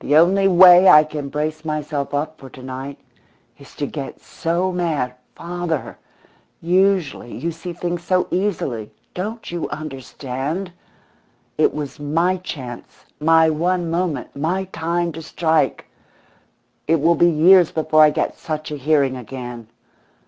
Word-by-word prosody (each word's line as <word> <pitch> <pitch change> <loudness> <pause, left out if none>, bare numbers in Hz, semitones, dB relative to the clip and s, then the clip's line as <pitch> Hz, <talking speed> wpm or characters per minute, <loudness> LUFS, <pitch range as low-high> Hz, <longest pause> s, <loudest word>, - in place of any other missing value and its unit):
"The 145 - +3
only 195 +4 +4
way 180 0 +8
I 150 +1 +8
can 150 -2 -6
brace 155 +2 -3
myself 150 -2 -3
up 150 +2 -3
for 135 - -11
to 130 - -13
night 130 +2 -7 0.6
is - - -16
to - - -2
get - - -7
so 175 +3 -2
mad 160 -8 -1 0.2
father, 170 -3 -4 0.6
usually 180 -7 0
you 170 - -3
see 165 +2 -7
things 175 0 -4
so 185 0 +1
easily! 160 - -2 0.2
Don't 215 +4 -5
you 175 -1 -3
understand? 145 +4 -5 0.8
It - - +3
was 150 -2 -6
my 165 +6 +1
chance, 130 -9 -9
my 160 +1 +4
one 170 +2 -1
moment, 165 -6 -2
my 170 +7 -1
time 170 +1 -1
to 165 +1 -8
strike. 160 0 0 1.0
It 165 +1 +3
will 165 +4 +4
be 175 +1 +4
years 175 +2 +5
before 155 -1 +2
I 155 - +8
get 150 - -2
such 155 -1 -5
a 150 - -4
hearing 140 -2 +1
again. 120 -1 -8
160 Hz, 140 wpm, -20 LUFS, 145-175 Hz, 1.0 s, way